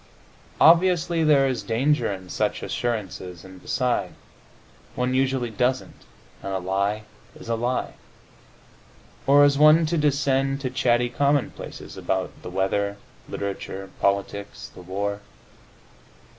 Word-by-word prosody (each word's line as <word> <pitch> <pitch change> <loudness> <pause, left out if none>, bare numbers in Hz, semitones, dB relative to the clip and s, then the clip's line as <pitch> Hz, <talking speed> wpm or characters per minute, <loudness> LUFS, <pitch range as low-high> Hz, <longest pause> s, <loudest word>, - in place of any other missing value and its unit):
Obviously, 170 0 +4
there 145 -3 +5
is 125 -4 -1
danger 120 +6 +1
in 95 -2 -7
such - - -2
assurances, 95 -7 -4
and 95 -1 -13
beside, 125 -1 -1 0.8
one 125 +1 0
usually 130 -2 0
doesn't, 125 +4 -2 0.4
and 100 - -5
a 95 - 0
lie 100 +3 -1 0.3
is - - -12
a 115 - +1
lie. 120 +2 -2 1.3
Or 145 +1 +7
is 140 0 +2
one 155 +2 +7
to 165 +1 0
descend 135 -2 +1
to 130 -2 -3
chatty 120 -1 +2
commonplaces 140 +2 -2
about - - -2
the - - -7
weather, 100 +2 -1 0.3
literature, 95 -1 -5
politics, 100 +1 -2
the - - -12
war? 100 +3 -3
120 Hz, 120 wpm, -24 LUFS, 100-140 Hz, 1.3 s, Or